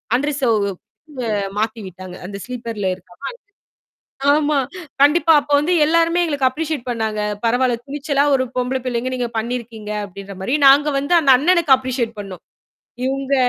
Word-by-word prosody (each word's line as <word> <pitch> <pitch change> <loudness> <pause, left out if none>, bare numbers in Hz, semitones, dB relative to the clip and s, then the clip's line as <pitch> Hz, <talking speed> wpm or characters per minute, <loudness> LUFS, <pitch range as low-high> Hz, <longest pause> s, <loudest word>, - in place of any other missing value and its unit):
Unreserved 255 -7 +1 0.6
அ - - -2 0.3
மாத்திவிட்டாங்க. 190 -5 -4
அந்த 200 +1 -6
ஸ்லீப்பர்ல 230 -5 -4
இருக்காம 185 +7 -10 1.0
ஆமா. 300 0 +2 0.4
கண்டிப்பா, 320 +3 +5
அப்போ 290 +1 -6
வந்து 335 +5 +1
எல்லாருமே 335 +2 +3
எங்களுக்கு 285 -5 +1
அப்ரிஷியேட் 300 -2 -4
பண்ணாங்க. 220 -2 -2 0.2
பரவாயில்ல, 245 +1 +2
துணிச்சலா 285 0 0
ஒரு 260 - +2
பொம்பள 250 +1 0
பிள்ளைகள் 250 +1 -2
நீங்க 245 -2 -2
பண்ணியிருக்கீங்க 225 -2 -5
அப்பிடின்றமாரி, 200 +5 -4
நாங்க 285 +2 +6
வந்து 285 +5 0
அந்த 275 -3 +5
அண்ணனுக்கு 335 -1 +4
அப்ரிஷியேட் 250 -3 -3
பண்ணோம். 195 -3 -9 0.6
இவுங்க 270 +1 -1
255 Hz, 130 wpm, -19 LUFS, 220-290 Hz, 1.0 s, நாங்க